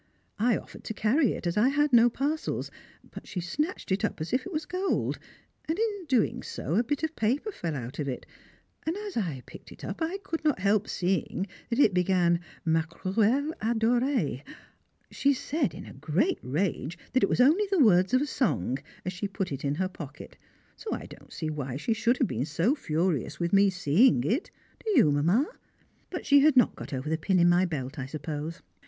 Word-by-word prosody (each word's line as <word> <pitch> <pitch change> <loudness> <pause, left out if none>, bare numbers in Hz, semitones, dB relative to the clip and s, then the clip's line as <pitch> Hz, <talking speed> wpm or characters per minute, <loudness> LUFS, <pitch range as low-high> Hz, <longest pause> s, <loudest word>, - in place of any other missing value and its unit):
I 235 +2 +3
offered - - -11
to 220 - -4
carry 240 +5 +2
it, - - -7
as 170 +3 -1
I 235 +5 +5
had 290 0 +1
no 240 0 +7
parcels, 290 +6 -2 0.4
but - - -10
she 185 - -4
snatched 290 - -3
it 195 +3 +1
up 210 - -1
as 155 +8 -4
if 255 +7 0
it - - -8
was 310 -2 -2
gold, 370 +4 -1 0.5
and 320 - 0
in 415 -4 -1
doing 255 -6 +1
so 155 - -4
a 220 +6 +3
bit 290 +5 -2
of 320 0 -2
paper 265 - 0
fell 165 - -4
out 130 +2 -6
of 145 - -2
it, 130 - -4 0.6
and 330 +4 -2
as 415 -1 -6
I 160 - -2
picked - - -13
it - - -10
up - - -6
I 330 +4 -1
could 325 - -4
not 300 -2 +2
help 200 +2 +1
seeing 185 0 -1 0.2
it 235 -4 +4
began 180 -1 +3 0.3
"Ma 160 0 +3
cruelle 220 - 0
adorée." 235 - +1 0.7
She 280 0 +2
said, 275 - -1
in - - -8
a - - -10
great 160 - 0
rage, 160 +2 -2 0.2
that 260 - +3
it - - +3
was - - 0
only 310 +12 +5
the 390 - +2
words 190 - +5
of 260 - +3
a - - 0
song, 135 - 0 0.3
as 185 - -2
she 200 +3 -3
put 195 -3 -4
it 140 -1 -5
in 140 0 0
her 185 +4 0
pocket; 150 -6 -10 0.4
so 450 - -8
I - - -5
don't - - -14
see 155 -2 -3
why 135 -4 -4
she 190 +10 0
should 235 +3 +1
have 250 - +2
been 125 +5 -2
so 165 - +1
furious 165 - -1
with 170 +1 -1
me 200 0 +6
seeing 180 - +3
it, 240 - 0 0.3
do 445 - -3
you, 185 - +6
Mamma? 170 - +3 0.6
but 360 - -5
she 285 0 +6
had 285 -1 +4
not 245 - +5
got - - -8
over 135 +1 -4
the 160 +1 0
pin 190 +4 +1
in 175 0 +5
my 175 +2 +4
belt, 145 -4 -4
I 130 - -4
suppose. 155 +3 -5
200 Hz, 210 wpm, -28 LUFS, -, 0.7 s, no